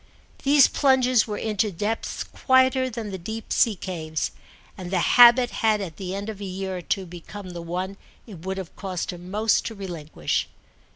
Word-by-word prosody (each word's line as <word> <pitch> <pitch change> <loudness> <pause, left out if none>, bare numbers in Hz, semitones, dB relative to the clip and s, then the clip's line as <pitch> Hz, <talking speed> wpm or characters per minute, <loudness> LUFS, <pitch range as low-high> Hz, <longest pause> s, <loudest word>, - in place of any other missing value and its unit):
These 280 0 +6
plunges 255 -4 +3
were 210 -1 -3
into 215 -1 0
depths 210 +5 -3
quieter 260 0 +2
than 225 -3 -5
the 190 - -5
deep 220 +6 -5
sea 225 -3 +3
caves, 160 -4 -3 0.4
and 180 -2 -7
the 185 - 0
habit 240 +6 +7
had 220 -2 +3
at 175 -6 -6
the 190 -1 -4
end 200 +1 -5
of 210 -2 -6
a - - -4
year 190 0 -4
or - - -6
two 190 +2 -2
become 180 +2 -9
the 175 -1 -6
one 180 +3 -4 0.3
it 185 -8 -11
would 190 +1 -3
have 190 -3 -7
cost 185 -3 -4
him 175 +1 -10
most 215 +3 +2
to 225 - -6
relinquish. 175 -6 -3
195 Hz, 185 wpm, -24 LUFS, 180-225 Hz, 0.4 s, habit